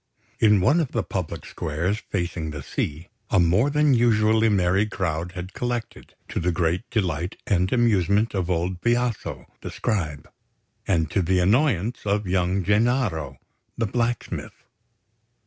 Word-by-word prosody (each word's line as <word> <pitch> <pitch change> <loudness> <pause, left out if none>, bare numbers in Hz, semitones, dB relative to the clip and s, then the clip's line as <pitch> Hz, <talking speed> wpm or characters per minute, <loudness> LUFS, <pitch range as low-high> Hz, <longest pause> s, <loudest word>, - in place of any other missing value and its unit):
In 105 -3 +5
one 145 - +4
of 155 -6 -2
the 115 - 0
public 90 -5 -4
squares 90 +8 -2
facing 85 -4 -2
the 75 -3 -6
sea, 75 +4 -4 0.2
a - - +3
more 90 +10 +3
than 150 -1 +3
usually 110 -2 +3
merry 95 +1 +2
crowd 90 -3 -3
had 90 0 -7
collected, 120 -2 -4
to - - -2
the 90 +1 +1
great 85 +4 -1
delight 90 - -1
and 90 -1 +1
amusement 105 -3 +2
of 95 -3 -1
old 90 +1 -1
Biaso, 120 - -1 0.2
the - - -6
Scribe, 75 -8 -2 0.6
and 80 -4 +1
to 100 - +2
the 90 +2 +1
annoyance 110 - +2
of 105 0 0
young 90 +1 +1
Gennaro, 105 - +1 0.4
the 115 - +1
blacksmith. 120 +2 -3
95 Hz, 145 wpm, -24 LUFS, 85-115 Hz, 0.6 s, In